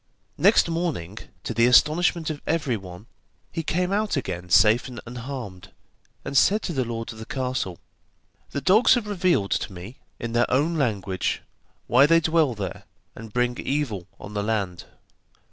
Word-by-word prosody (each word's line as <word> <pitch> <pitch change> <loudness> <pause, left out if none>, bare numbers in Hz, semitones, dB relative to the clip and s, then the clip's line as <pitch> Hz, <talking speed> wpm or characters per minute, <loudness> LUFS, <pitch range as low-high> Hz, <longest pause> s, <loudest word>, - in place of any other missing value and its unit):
Next - - +5
morning, 165 - -3 0.2
to - - -3
the 115 +1 +4
astonishment 160 +5 +3
of 145 - -7
everyone, 110 - -2 0.5
he 165 - -3
came 180 +3 -1
out 205 -4 0
again 90 -8 -4
safe 110 +7 +5
and 125 -2 -8
unharmed, 120 -6 -7 0.5
and - - -5
said 210 +9 +4
to 175 - -3
the 135 -3 0
lord 115 -1 -5
of 110 - -13
the 110 - -7
castle: 125 -9 -3 0.7
'The 140 - -4
dogs 215 - +5
have 240 -3 -2
revealed 180 - +1
to - - -1
me, 95 +7 -10 0.2
in 115 - -4
their 120 +1 +2
own 150 +6 +1
language, 105 - -1 0.4
why 130 +4 +5
they 165 +1 +5
dwell 160 -5 +2
there, 95 -4 -6 0.3
and 110 0 -10
bring 125 +1 0
evil 130 -11 -2
on 105 - -9
the 105 - -1
land. 100 -4 -2
125 Hz, 160 wpm, -24 LUFS, 105-160 Hz, 0.7 s, Next